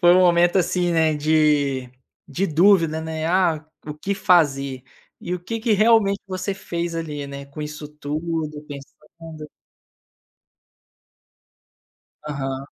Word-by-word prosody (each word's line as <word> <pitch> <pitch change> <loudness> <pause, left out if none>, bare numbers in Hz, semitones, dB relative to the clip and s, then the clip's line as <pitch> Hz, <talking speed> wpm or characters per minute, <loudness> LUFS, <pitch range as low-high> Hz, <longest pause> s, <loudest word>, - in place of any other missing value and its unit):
foi 175 -2 +6
um 185 - +5
momento, 175 +1 +4
assim, 175 0 +1
né, 160 -2 +2
de 145 -4 +1 0.4
de 180 +8 -1
dúvida, 165 -1 +3
né, 160 0 -4
ah, 170 -3 +1 0.2
o 150 - -4
que 190 +7 -3
fazer? 140 -9 +2 0.4
E 180 - -3
o 180 - -5
que 225 +5 -4
que 225 0 +1
realmente 210 -2 +4
você 185 +1 -3
fez 170 -3 -4
ali, 150 -3 -4
né, 140 0 -8
com 140 +2 -10
isso 150 0 -7
tudo, 150 +1 -4
pensando? 155 +2 -11 2.8
Aham. 135 -2 -4
160 Hz, 125 wpm, -22 LUFS, 150-180 Hz, 2.8 s, foi